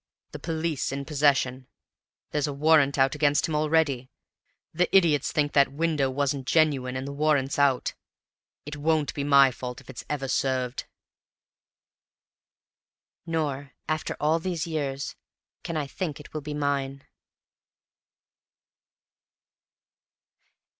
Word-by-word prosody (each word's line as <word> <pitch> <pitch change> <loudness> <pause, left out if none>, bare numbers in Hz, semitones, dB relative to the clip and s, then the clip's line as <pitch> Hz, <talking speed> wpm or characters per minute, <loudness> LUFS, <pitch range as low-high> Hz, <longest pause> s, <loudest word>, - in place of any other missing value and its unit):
The - - -7
police 160 -4 -2
in 140 0 -4
possession; 135 -4 +1 0.6
there's 150 0 0
a 145 - -3
warrant 145 -1 +4
out 135 -1 +3
against 145 -1 +2
him 160 - -4
already! 150 -4 +1 0.6
The 180 +3 +1
idiots 155 -6 +2
think 145 -1 0
that 140 -2 +4
window 150 -2 0
wasn't 135 0 -1
genuine, 140 -6 +2
and 130 +1 -4
the 140 - -5
warrant's 145 -2 +1
out. 140 -3 +2 0.7
It 145 0 -6
won't 155 0 0
be 145 - -3
my 140 -2 +6
fault 125 0 -7
if - - -12
it's 125 - -8
ever 140 -2 -2
served!" 130 -1 -1 2.4
Nor, 145 -4 -2
after 155 0 -2
all 155 +2 +2
these 170 -1 -2
years, 140 -4 -3 0.5
can 165 - -4
I 150 - -1
think 155 +1 -5
it 150 - -13
will 155 - -3
be 150 +1 -5
mine. 140 -2 -2
145 Hz, 125 wpm, -26 LUFS, 135-155 Hz, 2.4 s, my